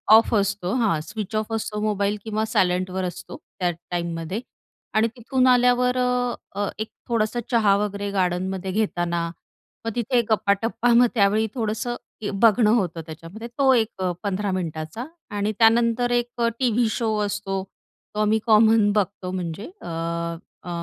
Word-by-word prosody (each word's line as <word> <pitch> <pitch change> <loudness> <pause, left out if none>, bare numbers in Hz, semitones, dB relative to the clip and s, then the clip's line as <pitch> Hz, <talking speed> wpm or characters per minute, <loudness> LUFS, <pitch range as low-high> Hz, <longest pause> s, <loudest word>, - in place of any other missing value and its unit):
Of 225 +1 +4
असतो. 200 -1 0
हां, 220 -11 +2
switch 210 +3 -6
off 215 +1 -1
असतो 210 -1 -2
मोबाईल 205 -1 0
किंवा 220 0 -1
सायलेंटवर 185 +1 +1
असतो, 175 - -7 0.2
त्या 175 -1 +1
टाईममध्ये. 170 +3 -4 0.5
आणि 220 +1 +3
तिथून 255 +2 +1
आल्यावर 250 0 +4
अ, 250 -1 +1 0.3
अ, 205 - +1
एक 215 - -3 0.2
थोडंसं 230 +1 0
चहा 215 -4 +4
वगैरे 205 0 -2
गार्डनमध्ये 185 0 -1
घेताना, 175 -5 0 0.6
मग 225 - -1
तिथे 240 +1 +2
गप्पाटप्पा 225 +3 +2
मग 245 +1 +6
त्यावेळी 215 +1 +3
थोडंसं 235 +1 -2 0.5
बघणं 220 -1 +5
होतं 175 -6 -1
त्याच्यामध्ये. 165 +8 -9
तो 265 +2 +3
एक 220 -5 0 0.2
15 200 0 -1
मिनिटाचा 165 +5 -4 0.3
आणि 205 +1 0
त्यानंतर 230 +1 +4
एक 240 0 -1 0.2
टीव्ही 240 -2 +2
शो 220 -1 -1
असतो. 195 -1 -3 0.5
तो - - -2
आम्ही 215 +1 +3
कॉमन 220 -1 +5
बघतो 195 -3 -1
म्हणजे 180 +2 -4 0.2
अ, - - -9 0.8
अ, 180 - -8
210 Hz, 140 wpm, -24 LUFS, 190-230 Hz, 0.8 s, मग